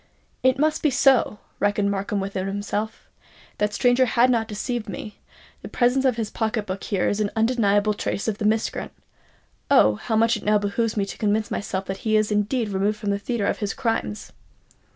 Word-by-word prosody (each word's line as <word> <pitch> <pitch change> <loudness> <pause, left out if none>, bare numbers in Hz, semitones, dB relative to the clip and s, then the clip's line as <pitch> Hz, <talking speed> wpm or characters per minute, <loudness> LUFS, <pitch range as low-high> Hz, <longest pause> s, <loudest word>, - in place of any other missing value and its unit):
"It 260 0 +3
must 305 +2 +1
be 305 - +3
so!" 265 -5 +3 0.2
reasoned 205 0 +1
Markham 200 +1 -2
within 195 -1 -3
himself; 205 +2 -4 0.5
"that 210 0 +1
stranger 245 +3 +3
has 245 +2 +3
not 225 -2 +1
deceived 220 +1 -4
me:—the 210 +2 -11
presence 255 +2 +2
of 255 -3 +3
this 225 -2 -3
pocket 220 -1 -1
book 190 0 -5
here 195 -3 0
is 205 - 0
an 210 -1 +1
undeniable 215 -3 +2
trace 200 0 -3
of 215 -2 -2
the 210 - -2
miscreant. 220 +1 0 0.8
Oh, 105 - +6
how 220 - -2
much 225 +1 +3
it 210 - -10
now 210 0 +3
behoves 215 +2 -1
me 200 - +1
to 195 - -9
convince 210 0 0
myself 195 -1 -3
that 190 0 -4
he 215 +2 +1
is 215 0 +1
indeed 210 +2 0
removed 200 +2 0
from 210 -1 -2
the 200 - -1
theatre 225 0 -2
of - - -1
his 205 -2 -2
crimes!" 225 - -2
215 Hz, 195 wpm, -23 LUFS, 200-235 Hz, 0.8 s, Oh